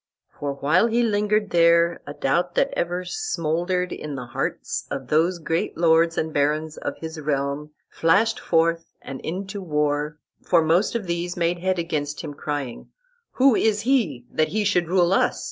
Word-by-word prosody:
"For 140 -1 -2
while 150 +10 +2
he 235 +1 +2
linger'd 210 -1 +1
there 170 0 +4
A 145 - -7
doubt 175 +6 0
that - - +2
ever 175 +1 -2
smoulder'd 180 - -1
in 150 -2 -5
the 125 -2 -6
hearts 130 +3 -3
Of 135 -2 -5
those 165 +4 +2
great 165 0 -2
Lords 165 0 +3
and 160 0 -1
Barons 150 +2 0
of - - -4
his 160 0 -7
realm 140 0 -2 0.2
Flash'd 200 +8 +2
forth 165 0 0
and 135 -1 -7
into 190 +4 -5
war: 150 -2 -1 0.2
for 170 -2 +3
most 170 +8 +2
of 225 -4 -2
these 175 0 -3
Made 175 0 0
head 185 +1 0
against 150 -4 -2
him, 150 -2 -6
crying, 145 -4 -5 0.4
'Who 260 -2 +4
is 215 -1 +2
he 220 - +1
That 155 - +1
he 210 +6 -1
should 180 -4 +1
rule 180 +1 +3
us? - - +2
170 Hz, 170 wpm, -23 LUFS, 150-185 Hz, 0.4 s, there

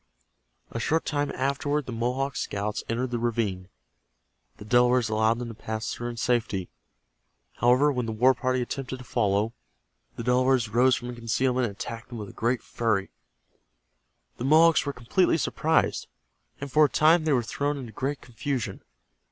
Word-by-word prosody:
A 115 - -4
short 160 +7 0
time 145 -1 -1
afterward 140 +2 -1
the 130 - -6
Mohawk 125 +4 -1
scouts 105 +1 -3
entered 120 +2 -1
the 120 - -1
ravine. 105 -6 -2 0.9
The 105 - -11
Delawares 125 +1 +3
allowed 110 +1 +2
them 120 -1 -5
to - - -7
pass 110 0 -4
through 120 0 -4
in 120 - -7
safety. 115 -6 0 0.9
However, 125 +5 +4
when 125 -4 -2
the - - -2
war 125 +4 +4
party 130 +1 0
attempted 130 +1 -5
to 125 - -11
follow, 105 -2 0 0.6
the - - -5
Delawares 125 -1 +2
rose 125 +4 +4
from 120 +1 -6
concealment 125 +2 0
and 100 - -8
attacked 115 +3 -7
them 120 - -7
with 105 -2 -8
great 120 +1 0
fury. 110 -5 -1 1.3
The 120 - -4
Mohawks 160 +2 +5
were - - 0
completely 150 +8 +1
surprised, 160 +1 0 0.5
and 140 -1 -6
for 155 +2 +6
a - - 0
time 160 +2 +4
they 155 - +3
were 125 -3 +2
thrown 145 +5 -2
into 125 -5 -7
great 140 +3 -3
confusion. 125 -4 -4
125 Hz, 165 wpm, -26 LUFS, 115-135 Hz, 1.3 s, for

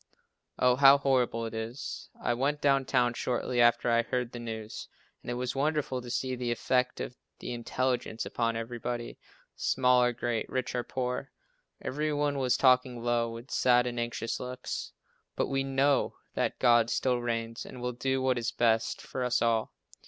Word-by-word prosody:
Oh, 125 0 +4
how 140 0 +8
horrible 125 -4 +1
it 115 - -6
is! 115 +4 -5
I 120 - 0
went 140 +5 0
down 135 -2 +3
town 125 -2 +2
shortly 120 0 -1
after 120 +1 +4
I 115 0 +4
heard 125 0 -2
the 120 - -7
news, 110 -2 -6 0.3
and - - -9
it 120 - -1
was 125 +1 -3
wonderful 140 -2 0
to 120 - -9
see 130 +1 -1
the 125 -1 -3
effect 125 +2 0
of 125 - -5 0.2
the - - -5
intelligence 120 -1 -2
upon 115 -1 -1
everybody, 120 +1 -4 0.4
small 125 -1 +3
or 125 0 +3
great, 120 -2 -2
rich 130 -1 -2
or 125 -1 -1
poor. 125 0 -3 0.5
Every 150 +3 -2
one 145 -1 0
was 130 -2 +2
talking 125 -2 +3
low, 120 -1 +1
with 115 +3 -9
sad 125 -1 +4
and 120 -1 -3
anxious 120 -1 -3
looks. 125 0 -5 0.4
But - - 0
we 135 0 0
know 135 +1 +2 0.2
that - - -1
God 120 -2 +4
still 125 0 +1
reigns 115 -1 -3
and 125 - -10
will 125 0 -3
do 130 +2 -1
what 130 -2 +2
is 120 +1 -2
best 115 -1 +1
for 130 - -4
us 125 -1 +2
all. 115 -1 +1
125 Hz, 180 wpm, -29 LUFS, 120-130 Hz, 0.5 s, how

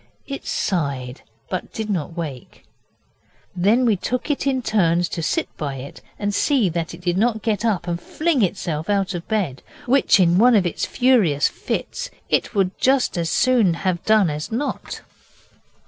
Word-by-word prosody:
It 275 -1 -7
sighed, 140 -8 -2 0.3
but 185 - -4
did 220 -1 -4
not 175 -4 -3
wake. 145 -8 -7 0.9
Then 210 +8 +3
we 225 -3 +3
took 250 +9 -2
it 280 -1 -2
in 260 -2 0
turns 175 -6 +2
to 165 - -4
sit 155 - 0
by 140 -3 -3
it 135 +2 -9 0.2
and 205 0 -2
see 255 -4 +2
that 170 0 -3
it 175 - -15
did 175 +1 0
not 220 -1 +1
get 220 -2 0
up 200 -6 0
and 170 0 -2
fling 315 -5 0
itself 170 -5 -2
out 195 -2 +1
of 175 -1 -6
bed, 190 - -1 0.2
which, 255 -4 +4
in 175 0 +4
one 245 +2 +6
of 195 -4 +3
its 175 - -2
furious 220 - +3
fits, - - -4 0.2
it - - 0
would 190 -2 +1
just 265 0 +2
as 170 -2 -1
soon 220 -2 +3
have 180 -1 -2
done 215 -6 +4
as 150 +5 -5
not. 250 +6 -3
190 Hz, 175 wpm, -21 LUFS, 170-230 Hz, 0.9 s, one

